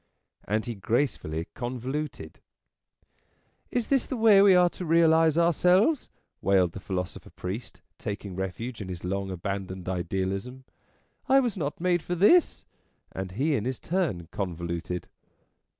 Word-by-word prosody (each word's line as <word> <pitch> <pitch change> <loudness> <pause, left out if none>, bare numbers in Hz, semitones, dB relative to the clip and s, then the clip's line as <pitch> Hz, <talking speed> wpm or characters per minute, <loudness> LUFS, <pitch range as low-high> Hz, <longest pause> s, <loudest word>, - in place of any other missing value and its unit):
And 110 +3 0
he 120 - -3
gracefully 100 - -1
con 125 +3 -4
voluted. 145 +5 -5 0.7
" - - -44 0.5
Is 245 -2 -2
this 270 -2 +2
the 260 - -3
way 220 -3 +7
we 195 -2 +7
are 180 0 +6
to - - -7
realize 160 -1 +4
ourselves?" 180 - +3 0.3
wailed 95 -3 +3
the 95 - -8
philosopher 90 -2 -5
priest, 100 +7 -7 0.2
taking 100 -2 -5
refuge 105 +6 -4
in 95 - -6
his 90 -2 -6
long 95 +1 -2
abandoned 95 0 -5
Idealism. 95 +7 -3 0.3
" - - -38
I 270 +1 +7
was 245 -5 0
not 150 -6 -3
made 175 0 +2
for 175 - -3
this." 255 - +4 0.5
And 95 -1 -5
he 145 +9 +1
in 110 - -2
his 130 -1 -3
turn 165 - -1
convoluted. 85 -1 -4
120 Hz, 150 wpm, -27 LUFS, -, 0.7 s, way